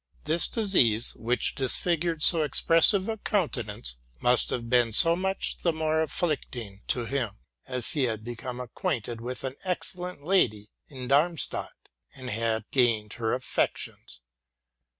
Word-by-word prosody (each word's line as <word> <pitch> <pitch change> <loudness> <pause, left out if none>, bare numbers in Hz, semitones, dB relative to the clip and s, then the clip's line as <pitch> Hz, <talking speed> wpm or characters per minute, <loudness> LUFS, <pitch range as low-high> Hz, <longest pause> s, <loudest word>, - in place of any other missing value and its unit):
This 160 +3 +3
disease, 130 - +4
which 120 +2 0
disfig 150 +5 +2
ured 165 -3 -2
so 165 -3 +5
expressive 165 - +4
a 225 -1 -3
countenance, 120 - -2 0.2
must 125 0 +2
have 120 -2 -3
been 120 -2 +2
so 165 +9 +7
much 190 +2 -2
the 170 - 0
more 160 0 0
afflicting 130 - -3
to 120 -2 0
him, 120 -6 -3 0.3
as 125 -2 -2
he 140 -4 0
had 110 -3 -3
become 120 +2 -7
acquainted 120 - -4
with 125 +2 -6
an 130 -1 -3
excellent 180 -3 -4
lady 110 - +1 0.2
in 130 -3 -8
Darmstadt, 155 +5 0 0.4
and 130 -1 -7
had 110 0 -1
gained 115 -5 +1
her 115 -1 -1
affections. 130 - -3
130 Hz, 140 wpm, -27 LUFS, 115-165 Hz, 0.4 s, so